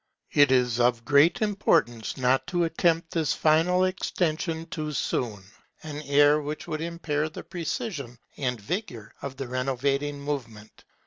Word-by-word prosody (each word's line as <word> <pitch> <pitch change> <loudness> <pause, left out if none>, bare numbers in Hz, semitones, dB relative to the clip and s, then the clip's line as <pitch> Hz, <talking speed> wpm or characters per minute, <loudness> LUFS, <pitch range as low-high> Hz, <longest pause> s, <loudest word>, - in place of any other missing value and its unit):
It 145 -2 +5
is 125 -2 +2
of 120 -1 +2
great 150 - +4
importance 120 - +1
not 130 0 +2
to 175 -2 +1
attempt 165 0 +1
this 160 -4 +1
final 165 +4 +3
extension 165 -3 -1
too 155 -2 -4
soon, 110 -7 -2 0.4
an 150 -1 -6
error 145 +1 +5
which 150 +1 -5
would 155 -1 -3
impair 160 -2 -2
the 155 - -9
precision 170 - -4 0.2
and 125 -4 -2
vigour 115 - -5
of 135 -1 -6
the 135 -2 -4
renovating 135 +3 -1
movement. 120 -7 -6
145 Hz, 140 wpm, -26 LUFS, 125-165 Hz, 0.4 s, It